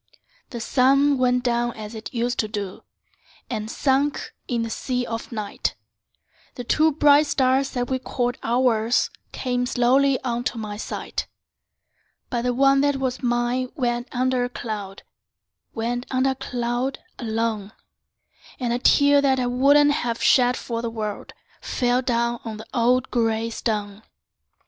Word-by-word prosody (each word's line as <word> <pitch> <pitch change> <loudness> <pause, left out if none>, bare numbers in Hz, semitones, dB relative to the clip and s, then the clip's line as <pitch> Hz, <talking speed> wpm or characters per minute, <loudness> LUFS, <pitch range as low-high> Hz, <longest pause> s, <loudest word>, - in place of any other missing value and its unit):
The 240 - -6
sun 275 +3 +3
went 250 -1 +2
down 240 -1 0
as 215 0 -8
it 220 -1 -7
used 240 0 -1
to 215 - +1
do, 205 -3 -5 0.7
And 215 -2 -3
sunk 275 +2 0
in 235 -2 -1
the 230 - -4
sea 250 +1 -2
of 230 +1 -5
night; 215 -3 -3 0.8
The 245 - -5
two 310 +6 +3
bright 290 0 +5
stars 265 0 +2
that 245 -1 -1
we 260 0 -1
called 245 -1 -2
ours 235 -1 +2 0.2
Came 245 -1 -1
slowly 260 +3 +3
unto 240 -1 -2
my 210 -2 -5
sight; 210 - -4 1.0
But 240 - 0
the 245 +1 0
one 275 +1 +4
that 285 0 +2
was 260 -2 -2
mine 245 +1 0
went 240 -3 -1
under 255 0 +1
a 245 - -2
cloud— 210 -5 -6 0.7
Went 240 +2 -2
under 260 +1 +2
a - - -3
cloud, 250 0 -2 0.2
alone; 220 -3 -2 0.9
And 240 -2 -1
a 240 - 0
tear 285 +2 +5
that 265 -2 +2
I 250 - 0
wouldn't 280 +4 +4
have 235 -5 -1
shed 250 -1 +4
for 230 -1 -4
the 235 - -2
world, 215 -2 -5 0.3
Fell 245 0 +1
down 235 -1 0
on 220 -2 -6
the 220 - -9
old 245 +1 +2
gray 225 -1 0
stone. 210 -3 -3
245 Hz, 150 wpm, -23 LUFS, 230-260 Hz, 1.0 s, bright